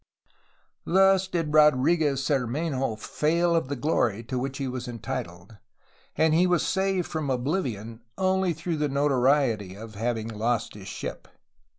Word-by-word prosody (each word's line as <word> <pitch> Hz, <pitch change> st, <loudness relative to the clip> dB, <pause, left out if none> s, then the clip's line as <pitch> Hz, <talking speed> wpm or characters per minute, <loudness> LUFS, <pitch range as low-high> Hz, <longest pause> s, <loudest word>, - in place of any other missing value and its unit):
Thus 190 Hz, +1 st, +4 dB
did 165 Hz, -5 st, -2 dB
Rodriguez 150 Hz, -1 st, +4 dB
Cermenho 135 Hz, -1 st, -1 dB
fail 170 Hz, +8 st, +1 dB
of 165 Hz, -5 st, +1 dB
the 140 Hz, -, -3 dB
glory 120 Hz, -5 st, 0 dB
to 125 Hz, +2 st, -3 dB
which 135 Hz, +1 st, -4 dB
he 135 Hz, -, -3 dB
was 125 Hz, -1 st, -5 dB
entitled, 105 Hz, -4 st, -6 dB, 0.6 s
and 160 Hz, 0 st, +3 dB
he 175 Hz, +3 st, +4 dB
was 175 Hz, -2 st, +2 dB
saved 190 Hz, -2 st, 0 dB
from 155 Hz, -3 st, -3 dB
oblivion 125 Hz, -, -2 dB, 0.2 s
only 190 Hz, -1 st, +1 dB
through 165 Hz, +1 st, -3 dB
the 150 Hz, -1 st, 0 dB
notoriety 135 Hz, -7 st, +1 dB
of 110 Hz, +1 st, -10 dB
having 110 Hz, +1 st, -2 dB
lost 115 Hz, +2 st, -1 dB
his 100 Hz, -2 st, -11 dB
ship. -, -, -6 dB
140 Hz, 145 wpm, -26 LUFS, 115-165 Hz, 0.6 s, Thus